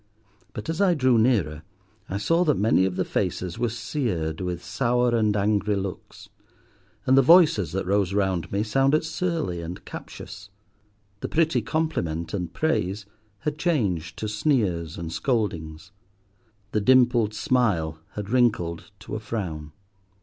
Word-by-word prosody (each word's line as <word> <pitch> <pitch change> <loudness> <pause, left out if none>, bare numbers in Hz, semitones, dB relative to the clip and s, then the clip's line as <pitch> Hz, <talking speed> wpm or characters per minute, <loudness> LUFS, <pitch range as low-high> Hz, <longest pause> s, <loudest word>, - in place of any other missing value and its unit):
But 105 - -7
as 165 +3 -2
I 185 -3 +4
drew 130 -5 +3
nearer, 100 - +1 0.5
I 100 - -2
saw 165 - +2
that 150 -4 +2
many 105 -3 +3
of 95 -1 -2
the - - 0
faces 90 -2 -2
were 120 - +1
seared 105 - -3
with 90 -1 -4
sour 120 -1 +1
and 105 -2 +2
angry 105 0 +1
looks, 95 -1 -6 0.8
and 130 - +4
the 135 - +7
voices 150 - +5
that 95 - -2
rose 100 0 +1
round 95 -4 0
me 100 +2 0
sounded 135 +7 +2
surly 160 - -2
and 85 +2 -7
captious. 100 0 -9 0.7
The - - -4
pretty 165 0 +2
compliment 85 - -2
and 90 -4 -3
praise 100 - -1 0.4
had 150 0 -3
changed 95 - 0
to 110 - -3
sneers 105 - 0
and 85 -1 -5
scoldings. 95 - -2 0.8
The 105 - 0
dimpled 120 -2 +4
smile 100 -10 +1
had 105 0 -6
wrinkled 105 -11 +1
to - - -9
a - - -2
frown. 90 -9 -5
105 Hz, 145 wpm, -25 LUFS, 90-130 Hz, 0.8 s, the